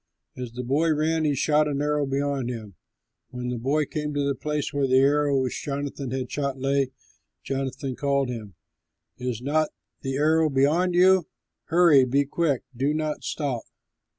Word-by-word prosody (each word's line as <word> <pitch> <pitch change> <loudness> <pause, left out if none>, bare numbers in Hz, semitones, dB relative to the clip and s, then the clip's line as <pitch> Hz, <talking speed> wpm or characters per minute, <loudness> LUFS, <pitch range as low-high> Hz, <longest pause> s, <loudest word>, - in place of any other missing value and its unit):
As 125 -2 -6
the 125 +1 -5
boy 155 +6 +2
ran, 160 +1 +1
he 145 -2 +2
shot 150 +3 +3
an 140 -2 -1
arrow 150 -1 0
beyond 135 -2 -1
him. 110 -5 -6 0.6
When 125 0 -5
the 125 -1 -3
boy 145 +5 +1
came 150 +1 -4
to 145 -1 +1
the 140 - +1
place 150 +1 -3
where 140 -1 +1
the 130 0 +4
arrow 140 +1 +3
which 130 - -3
Jonathan 140 -1 -4
had 130 -1 -3
shot 140 -2 -2
lay, 135 0 +1 0.5
Jonathan 135 -1 -3
called 140 -1 0
to - - -2
him, 105 -6 -8 0.6
"Is 125 -2 -3
not 155 +3 +1 0.3
the 135 -1 -2
arrow 155 +2 +3
beyond 155 +7 +2
you? 185 -1 +5 0.4
Hurry, 165 -5 +5
be 140 +3 +2
quick, 145 -2 0
do 140 +5 0
not 155 -1 -2
stop!" 140 -6 -2
140 Hz, 175 wpm, -25 LUFS, 130-150 Hz, 0.6 s, you